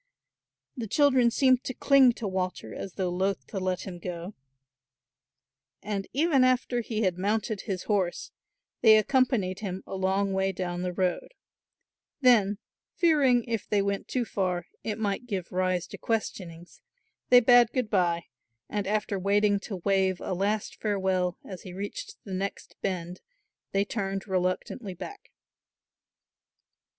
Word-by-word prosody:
The 235 -4 -4
children 260 -1 +4
seemed 255 +1 +3
to 260 - -5
cling 270 -3 +5
to 225 -2 -5
Walter 185 -1 -3
as 190 - -6
though 185 -2 -2
loth 190 +2 -1
to 195 - -5
let 185 -1 -1
him 180 -3 -7
go 175 +2 -6 1.5
and 200 -1 -3
even 285 -2 +3
after 255 -1 +2
he 225 -1 -2
had 180 -2 0
mounted 210 +1 -1
his 190 -4 -4
horse 195 -5 -1 0.5
they 220 -2 +8
accompanied 225 -6 +1
him 190 -3 -5
a - - -8
long 190 +1 0
way 190 0 +1
down 175 -1 -3
the 180 0 -2
road; 180 - -2 0.8
then, 220 -7 +4 0.4
fearing, 285 -9 +4
if 225 -3 -4
they 205 -1 +2
went 200 0 -2
too 250 -2 -1
far, 180 -5 -1 0.2
it 215 -1 -3
might 215 +2 -2
give 190 -6 -4
rise 185 -1 0
to - - -10
questionings 175 -6 -4 0.5
they 245 - +9
bade 245 -1 +6
good 250 -3 -1
bye 175 -3 +2 0.4
and 205 -2 -3
after 210 -1 -1
waiting 205 +1 +2
to 200 0 -6
wave 190 -2 +2
a - - -3
last 205 +3 -1
farewell 190 -4 0
as 185 -3 -8
he 180 - -9
reached 435 - -6
the 195 - -7
next 195 +2 -4
bend 180 -2 -3 0.5
they 195 +1 +1
turned 195 -1 -3
reluctantly 185 +2 -2
back. 405 - -9
200 Hz, 145 wpm, -28 LUFS, 185-230 Hz, 1.5 s, they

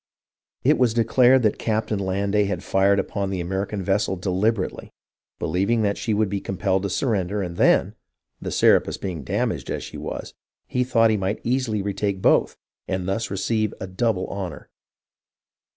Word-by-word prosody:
It - - +4
was 120 -3 +3
declared 125 +2 +4
that 105 - +1
Captain 110 -2 -1
Landais 100 +2 0
had 95 -2 -3
fired 100 +1 +3
upon 100 0 -2
the 95 -2 -3
American 95 +3 -3
vessel 95 +1 +1
deliberately, 95 +3 -1 0.5
believing 100 +7 0
that 100 -1 +1
she 115 - -3
would 105 0 +2
be 100 0 -3
compelled 95 0 0
to 100 - -2
sur 130 +7 0
render, 100 0 -1
and 85 -2 -5
then, - - +3 0.5
the - - -4
Serapis - - +3
being 90 -7 -5
damaged - - -2
as - - -3
she - - -8
was, - - -6 0.3
he 125 - 0
thought 115 -3 +3
he 110 - +2
might 95 +1 -2
easily 120 -4 0
retake 100 -1 -2
both - - +3 0.3
and 95 -1 -2
thus 100 +4 -1
receive 110 +2 -1
a - - -4
double 95 0 -1
honour. 95 -5 -6
100 Hz, 170 wpm, -23 LUFS, 95-110 Hz, 0.5 s, It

